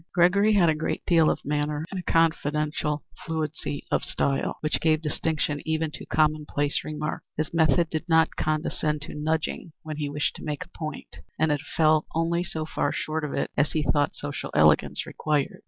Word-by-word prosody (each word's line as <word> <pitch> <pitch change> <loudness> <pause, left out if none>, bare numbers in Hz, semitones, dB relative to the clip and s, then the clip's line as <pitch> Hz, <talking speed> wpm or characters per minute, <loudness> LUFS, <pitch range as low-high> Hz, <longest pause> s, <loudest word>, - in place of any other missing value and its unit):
Gregory 200 +5 +5
had 190 -5 +5
a 160 - +4
great 155 +1 -3
deal 165 -3 +5
of - - -2
manner 150 +1 -1
and 190 - -3
a 180 - -3
confidential 150 -2 +1 0.2
fluency 155 -3 -3
of - - +2
style, 135 -1 -1
which 155 - 0
gave 155 -1 +3
distinction 150 -1 -1
even 160 0 -1
to - - -9
commonplace 150 -2 +1
remarks. 155 0 -4
His 155 +1 -2
method 160 0 +3
did 160 +2 -3
not 160 0 +4
condescend 155 -1 -1
to - - -8
nudging 160 +1 -2
when 155 -1 -5
he 145 -2 -2
wished 145 +1 -1
to - - -10
note 150 +2 -3
a - - -24
point, 155 -3 -7 0.2
but 155 0 +2
it 145 -1 0 0.2
fell 155 -1 +4
only 170 +1 +1
so 160 -3 -4
far 160 - -1
short 155 0 -2
of 150 - -3
it - - -1
as 145 +1 +1
he 155 - +1
thought 145 -1 +1
social 145 0 -5
elegance - - +4
required. 150 -3 -1
155 Hz, 190 wpm, -26 LUFS, 150-160 Hz, 0.2 s, Gregory